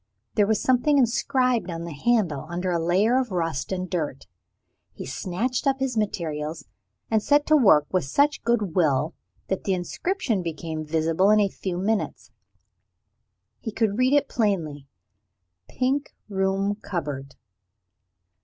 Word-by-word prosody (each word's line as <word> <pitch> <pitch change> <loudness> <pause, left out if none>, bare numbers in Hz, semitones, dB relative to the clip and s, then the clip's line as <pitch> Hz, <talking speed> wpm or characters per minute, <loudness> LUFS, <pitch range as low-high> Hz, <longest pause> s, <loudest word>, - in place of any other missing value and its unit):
There 205 -1 +3
was 220 0 +2
something 260 +3 +3
inscribed 250 -4 +2
on 165 -1 -4
the 170 -1 -6
handle, 170 - 0
under 180 +1 -2
a 170 -1 0
layer 205 +9 +3
of 255 -2 -2
rust 165 -5 -2
and 185 -1 -2
dirt. 155 -7 -3 0.7
He - - -8
snatched 240 +10 -2
up 270 -1 +2
his 265 -2 -1
materials, 160 -7 -2 0.5
and 220 -1 +3
set 290 +5 +3
to 310 - +4
work 195 - +6
with 185 - +2
such 285 - +2
good 215 -7 0
will 155 -2 +2 0.3
that 190 - -2
the 195 - +2
inscription 225 - -2
became 160 -2 -4
visible 160 +4 +1
in 215 0 +5
a 200 -1 +3
few 185 -2 -4
minutes. 190 - -2 1.3
He 220 - -5
could 215 0 0
read 255 +2 +3
it 290 -1 +3
plainly 165 - -1 0.8
"Pink 270 +3 -1
Room 195 0 0
Cupboard." 145 -8 -5
195 Hz, 145 wpm, -25 LUFS, 165-240 Hz, 1.3 s, work